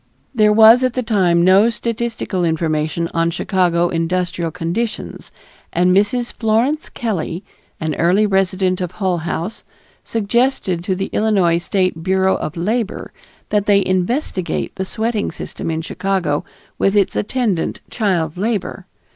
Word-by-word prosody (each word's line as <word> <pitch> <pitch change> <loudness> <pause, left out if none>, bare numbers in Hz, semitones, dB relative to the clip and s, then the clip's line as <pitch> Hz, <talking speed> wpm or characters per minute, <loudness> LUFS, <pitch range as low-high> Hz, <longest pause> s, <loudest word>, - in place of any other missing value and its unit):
There 215 -3 +4
was 225 +3 +7
at 255 -1 +1
that 255 -1 -2
time 180 -6 +3
no 195 +5 +5
statistical 230 -5 -3
information 160 0 0
on 165 0 +1
Chicago 175 -1 +1
industrial 175 0 -1
conditions, 180 +7 -4 0.4
and 180 +2 +3
Mrs. 235 +5 +1
Florence 235 +7 0
Kelley, 195 -6 -3 0.4
an 160 -1 -2
early 180 +7 +3
resident 190 -2 +1
of 180 -1 -3
Hull 185 -4 -1
House, 170 +5 -4 0.4
suggested 225 -5 0
to 190 - 0
the 195 +1 -4
Illinois 190 -6 +2
State 185 -1 -1
Bureau 190 +2 +2
of 155 +3 -5
Labor 215 +5 -2 0.4
that 205 -1 0
they 200 -2 +4
investigate 185 - -1
the 190 - -4
sweating 220 +1 -1
system - - -6
in 160 0 -2
Chicago 180 -4 -1 0.4
with 195 +1 +2
its 200 -2 +2
attendant 210 -6 -1
child 180 -8 -1
labor. 200 -2 -2
190 Hz, 135 wpm, -18 LUFS, 170-220 Hz, 0.4 s, was